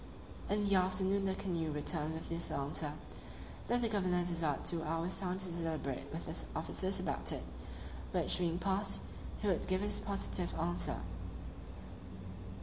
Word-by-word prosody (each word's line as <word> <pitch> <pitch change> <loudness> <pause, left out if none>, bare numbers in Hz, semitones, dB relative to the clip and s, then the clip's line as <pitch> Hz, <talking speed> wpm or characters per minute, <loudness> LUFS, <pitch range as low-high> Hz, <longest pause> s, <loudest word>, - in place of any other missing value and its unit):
In 205 0 +3
the 200 - +4
afternoon 190 +1 +3
the 190 -1 +2
canoe 170 -5 0
returned 150 +1 +1
with 160 - -5
this 170 0 -2
answer: 145 +1 -1 0.7
"That 245 0 +3
the 235 - +3
governor 185 -4 +3
desired 165 -5 0
two 170 -1 +3
hours' 165 +3 0
time 185 -1 0
to 190 -1 0
deliberate 160 -5 -2
with 165 - -4
his 160 - -3
officers 185 +4 0
about - - 0
it, - - -2 0.7
which - - +6
being 170 -1 +2
past, 195 +2 +1 0.4
he - - +2
would 185 -4 +2
give 185 0 +2
his 205 - 0
positive 195 -3 -1
answer." 85 0 0
180 Hz, 150 wpm, -36 LUFS, 160-195 Hz, 0.7 s, which